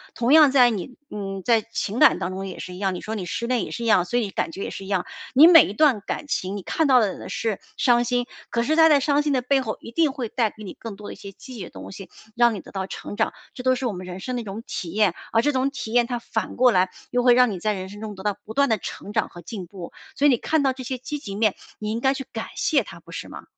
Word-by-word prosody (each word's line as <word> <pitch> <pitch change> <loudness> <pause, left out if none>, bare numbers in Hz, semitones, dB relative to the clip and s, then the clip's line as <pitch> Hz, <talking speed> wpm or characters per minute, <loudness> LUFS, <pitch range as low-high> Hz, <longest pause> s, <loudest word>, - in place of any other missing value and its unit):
同 240 +4 +2
样 305 -3 +8
在 250 -3 +6
你， 220 +4 -5 0.2
嗯， 195 -2 -5
在 230 -2 +4
情 225 0 -4
感 305 - +7
当 180 - -3
中 195 +1 -5
也 185 - -7
是 180 - -7
一 180 - -9
样， 195 -2 0
你 - - -6
说 220 - -5
你 200 -5 -4
失 205 +5 -3
恋 245 -1 0
也 - - -6
是 235 - -5
一 230 - -1
样， 185 -5 +5
所 240 - -1
以 210 -5 -2
感 - - -2
觉 195 - -6
也 - - -4
是 195 - -7
一 - - -10
样， 190 -3 0 0.3
你 290 +5 +9
每 335 -1 +9
一 200 - -5
段 270 -5 +3
感 245 - -4
情， 195 -6 -2
你 195 - -7
看 320 - 0
到 255 -2 +6
的 205 -4 -2
是 220 -4 -2 0.2
伤 240 -2 +4
心， 245 0 0 0.2
可 235 - 0
是 310 +6 +1
它 320 0 +7
在 290 -2 +6
伤 285 +1 +2
心 295 -1 0
的 255 -2 +1
背 270 +1 +2
后 220 -4 -4
一 - - -9
定 305 +3 +2
会 250 -6 -5
带 230 -4 +1
给 215 - -13
你 195 - -7
更 225 -3 -8
多 205 +1 -9
的 - - -6
一 - - -11
些 200 - -10
积 260 +6 -12
极 220 -6 -6
的 - - -8
东 95 +1 -10
西， 195 - -10 0.3
让 235 -2 +4
你 - - -5
得 - - -13
到 190 -1 -4
成 - - -7
长， 220 +1 +1 0.2
这 250 - -7
都 255 0 +3
是 255 - -4
我 230 - -1
们 180 0 -7
人 180 +1 -6
生 255 +6 -4
的 245 - -2
一 - - -7
种 210 +2 -7
体 175 - -5
验， 200 0 +2 0.2
而 225 - +3
这 295 - +3
种 260 +1 +1
体 245 -5 -6
验 240 -1 +4
它 245 -1 -2
反 220 -2 -4
过 250 0 +5
来 185 -2 +3 0.2
又 245 - +2
会 245 -1 +6
让 250 -2 +5
你 190 - -5
在 210 +4 0
人 190 -1 -5
生 205 +2 -11
中 215 -2 -6
得 190 - -10
到 205 -1 0
不 220 - -9
断 280 0 +4
的 220 -4 +1
成 205 - -7
长 - - 0
和 175 -1 -12
进 190 -3 -7
步， 180 -2 -9 0.2
所 285 - +1
以 290 - +7
你 240 - +3
看 315 +3 0
到 265 -1 +2
这 260 - -8
些 260 +1 -3
积 295 +4 -5
极 200 -8 -7
面， 215 -1 +2 0.2
你 215 0 -4
应 230 +1 -2
该 265 +1 +2
去 270 - -5
感 - - -4
谢 - - +2
它 - - -11
不 - - -16
是 - - -6
吗？ - - -9
230 Hz, 340 characters per minute, -24 LUFS, 195-255 Hz, 0.3 s, 你